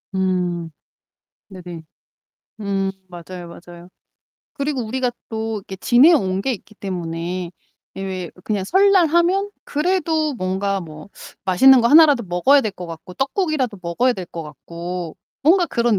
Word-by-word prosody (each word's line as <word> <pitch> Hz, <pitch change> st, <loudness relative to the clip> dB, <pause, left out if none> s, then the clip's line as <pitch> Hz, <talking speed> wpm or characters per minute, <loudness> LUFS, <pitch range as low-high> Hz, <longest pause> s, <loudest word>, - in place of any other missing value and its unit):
음. 180 Hz, -3 st, -1 dB, 0.8 s
네네. 175 Hz, -4 st, -9 dB, 0.8 s
음 195 Hz, -1 st, -1 dB, 0.2 s
맞아요, 175 Hz, 0 st, -9 dB
맞아요. 175 Hz, +1 st, -13 dB, 0.6 s
그리고 280 Hz, -3 st, -2 dB
우리가 250 Hz, +2 st, -1 dB, 0.2 s
또 220 Hz, 0 st, -3 dB
이렇게 190 Hz, -1 st, -9 dB
지내온 240 Hz, -, +4 dB
게 265 Hz, -, 0 dB
있기 215 Hz, 0 st, -9 dB
때문에 175 Hz, -2 st, -4 dB, 0.4 s
왜 195 Hz, -, -6 dB
왜 185 Hz, -3 st, -5 dB
그냥 205 Hz, -3 st, -1 dB
설날 380 Hz, -, +4 dB
하면 350 Hz, +5 st, +2 dB
그래도 315 Hz, -2 st, 0 dB
뭔가 195 Hz, 0 st, -1 dB
뭐 155 Hz, 0 st, -10 dB, 0.4 s
맛있는 260 Hz, +8 st, +7 dB
거 235 Hz, -, +3 dB
하나라도 290 Hz, -6 st, +6 dB
먹어야 195 Hz, +11 st, +4 dB
될 215 Hz, -, -2 dB
것 180 Hz, -2 st, -8 dB
같고, 165 Hz, +2 st, -10 dB
떡국이라도 270 Hz, -, -1 dB
먹어야 240 Hz, +10 st, +1 dB
될 185 Hz, -5 st, -7 dB
것 165 Hz, -1 st, -7 dB
같고 170 Hz, +3 st, -7 dB, 0.3 s
뭔가 350 Hz, +5 st, +5 dB
그런 235 Hz, -7 st, +1 dB
195 Hz, 280 characters per minute, -20 LUFS, 180-270 Hz, 0.8 s, 맛있는